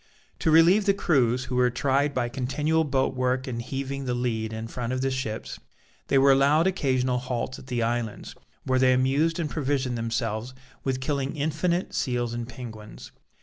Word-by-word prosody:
To -, -, +1 dB
relieve 170 Hz, +6 st, +6 dB
the 200 Hz, -, +4 dB
crews, 130 Hz, -9 st, +2 dB
who 125 Hz, 0 st, -4 dB
were 125 Hz, 0 st, +4 dB
tried 140 Hz, +4 st, +1 dB
by 120 Hz, -1 st, +1 dB
continual 145 Hz, +6 st, 0 dB
boat 135 Hz, -3 st, 0 dB
work 130 Hz, 0 st, 0 dB
and 120 Hz, -3 st, -4 dB
heaving 135 Hz, +2 st, -4 dB
the 125 Hz, -1 st, -1 dB
lead 115 Hz, -3 st, -2 dB
in 110 Hz, 0 st, -5 dB
front 120 Hz, +1 st, -4 dB
of 130 Hz, -, -1 dB
the 135 Hz, 0 st, 0 dB
ships, 115 Hz, -4 st, -4 dB, 0.5 s
they 135 Hz, -, +3 dB
were 135 Hz, +1 st, +6 dB
allowed 140 Hz, +4 st, +4 dB
occasional 130 Hz, -9 st, +1 dB
halts 125 Hz, +1 st, -4 dB
at -, -, -14 dB
the 120 Hz, -3 st, -1 dB
islands, 115 Hz, -1 st, -3 dB, 0.3 s
where 130 Hz, 0 st, +1 dB
they 130 Hz, 0 st, +5 dB
amused 140 Hz, +6 st, +2 dB
and 165 Hz, -3 st, -1 dB
provisioned 135 Hz, -5 st, -1 dB
themselves 115 Hz, +1 st, -2 dB, 0.3 s
with 130 Hz, -1 st, -1 dB
killing 140 Hz, +1 st, -2 dB
infinite 160 Hz, +4 st, -1 dB
seals 120 Hz, -3 st, -1 dB
and 120 Hz, 0 st, -5 dB
penguins. 115 Hz, -3 st, -9 dB
130 Hz, 180 wpm, -26 LUFS, 120-140 Hz, 0.5 s, relieve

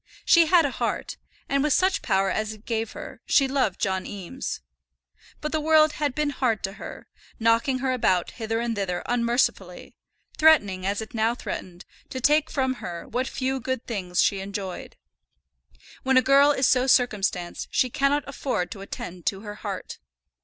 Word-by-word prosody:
She 335 Hz, -1 st, +6 dB
had 335 Hz, -1 st, +5 dB
a 280 Hz, -, -1 dB
heart, -, -, -3 dB, 0.3 s
and 275 Hz, 0 st, +1 dB
with 300 Hz, -1 st, +2 dB
such 380 Hz, +1 st, +2 dB
power 195 Hz, -2 st, +1 dB
as 215 Hz, 0 st, -2 dB
it 215 Hz, 0 st, -16 dB
gave 225 Hz, -1 st, -2 dB
her, -, -, -9 dB
she 275 Hz, -, +4 dB
loved 260 Hz, -8 st, 0 dB
John 190 Hz, -1 st, 0 dB
Eames. 205 Hz, +6 st, -5 dB, 0.8 s
But 300 Hz, -, -3 dB
the 315 Hz, -, 0 dB
world 310 Hz, 0 st, +5 dB
had 290 Hz, -3 st, -2 dB
been 300 Hz, -1 st, 0 dB
hard 250 Hz, -5 st, 0 dB
to 195 Hz, -, -2 dB
her; -, -, -8 dB, 0.3 s
knocking 230 Hz, +4 st, +2 dB
her 260 Hz, -, +2 dB
about 185 Hz, -8 st, +1 dB
hither 225 Hz, -1 st, -3 dB
and 235 Hz, -1 st, -1 dB
thither 190 Hz, -3 st, -2 dB
unmercifully; 240 Hz, +1 st, -1 dB, 0.4 s
threatening, 205 Hz, -13 st, +4 dB
as 200 Hz, +2 st, -1 dB
it 220 Hz, -, -13 dB
now 225 Hz, +1 st, +1 dB
threatened, 180 Hz, -7 st, -7 dB, 0.2 s
to 260 Hz, -, -5 dB
take 300 Hz, +4 st, +3 dB
from 260 Hz, -2 st, -1 dB
her 170 Hz, -1 st, -6 dB
what 250 Hz, +3 st, -2 dB
few 265 Hz, 0 st, -2 dB
good 260 Hz, 0 st, -3 dB
things 185 Hz, -6 st, -3 dB
she 200 Hz, -, +1 dB
enjoyed. 195 Hz, -1 st, -6 dB, 1.1 s
When 265 Hz, 0 st, +3 dB
a 255 Hz, -, +5 dB
girl 275 Hz, +3 st, +6 dB
is 270 Hz, -3 st, +2 dB
so 255 Hz, 0 st, +3 dB
circumstanced 200 Hz, -9 st, +1 dB
she 255 Hz, -, +1 dB
cannot 275 Hz, +3 st, +1 dB
afford 265 Hz, -9 st, -2 dB
to 200 Hz, -, -7 dB
attend 180 Hz, -3 st, -7 dB
to 195 Hz, -1 st, 0 dB
her 210 Hz, -1 st, -7 dB
heart. -, -, -6 dB
240 Hz, 175 wpm, -25 LUFS, 200-275 Hz, 1.1 s, She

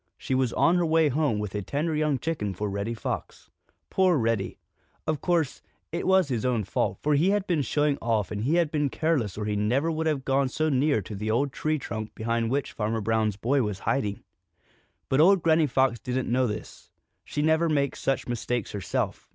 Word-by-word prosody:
She -, -, -3 dB
was 130 Hz, -2 st, +2 dB
on 175 Hz, +2 st, +3 dB
her 175 Hz, -, +2 dB
way 160 Hz, -1 st, +4 dB
home 145 Hz, -4 st, +1 dB
with 105 Hz, -2 st, -4 dB
a 105 Hz, -, -2 dB
tender 150 Hz, -, -2 dB
young 150 Hz, -2 st, +1 dB
chicken 115 Hz, -, -3 dB
for 105 Hz, +2 st, -3 dB
Reddy 100 Hz, +4 st, -3 dB
Fox. 110 Hz, -, -5 dB, 0.4 s
Poor 185 Hz, -3 st, +3 dB
Reddy! 115 Hz, -5 st, -1 dB, 0.5 s
Of 155 Hz, -2 st, -1 dB
course, 170 Hz, -6 st, 0 dB, 0.3 s
it 170 Hz, +2 st, -3 dB
was 190 Hz, -3 st, +4 dB
his 120 Hz, -4 st, -1 dB
own 125 Hz, -4 st, +1 dB
fault, 95 Hz, -, -1 dB
for 150 Hz, -, +2 dB
he 155 Hz, +6 st, +3 dB
had 205 Hz, -1 st, +1 dB
been 170 Hz, -6 st, +1 dB
showing 145 Hz, +1 st, +1 dB
off 110 Hz, -3 st, 0 dB
and 105 Hz, -1 st, -3 dB
he 145 Hz, +7 st, +2 dB
had 170 Hz, -3 st, +2 dB
been 150 Hz, -2 st, +1 dB
careless 135 Hz, -, 0 dB
or 105 Hz, -, -3 dB
he 105 Hz, 0 st, -1 dB
never 125 Hz, +10 st, +1 dB
would 160 Hz, 0 st, -1 dB
have 145 Hz, -4 st, -1 dB
gone 135 Hz, 0 st, +2 dB
so 155 Hz, +4 st, 0 dB
near 140 Hz, -5 st, +2 dB
to 105 Hz, -, -8 dB
the 105 Hz, +2 st, -4 dB
old 130 Hz, +5 st, +1 dB
tree 155 Hz, -1 st, 0 dB
trunk 110 Hz, -5 st, -6 dB
behind 115 Hz, 0 st, -1 dB
which 140 Hz, +2 st, -1 dB
Farmer 110 Hz, +1 st, -2 dB
Brown's 110 Hz, -1 st, 0 dB
boy 130 Hz, +7 st, +1 dB
was 105 Hz, -4 st, -2 dB
hiding. 110 Hz, -4 st, -1 dB, 0.8 s
But 135 Hz, +3 st, +3 dB
old 190 Hz, +1 st, +5 dB
Granny 160 Hz, -1 st, +4 dB
Fox 130 Hz, -2 st, +2 dB
didn't 125 Hz, -1 st, -2 dB
know 130 Hz, +1 st, +2 dB
this. 105 Hz, -1 st, -7 dB, 0.3 s
She 150 Hz, -, -3 dB
never 160 Hz, +2 st, +3 dB
makes 140 Hz, -3 st, 0 dB
such 135 Hz, -, -1 dB
mistakes 120 Hz, -1 st, -2 dB
herself. 100 Hz, -4 st, -3 dB
135 Hz, 210 wpm, -26 LUFS, 110-155 Hz, 0.8 s, old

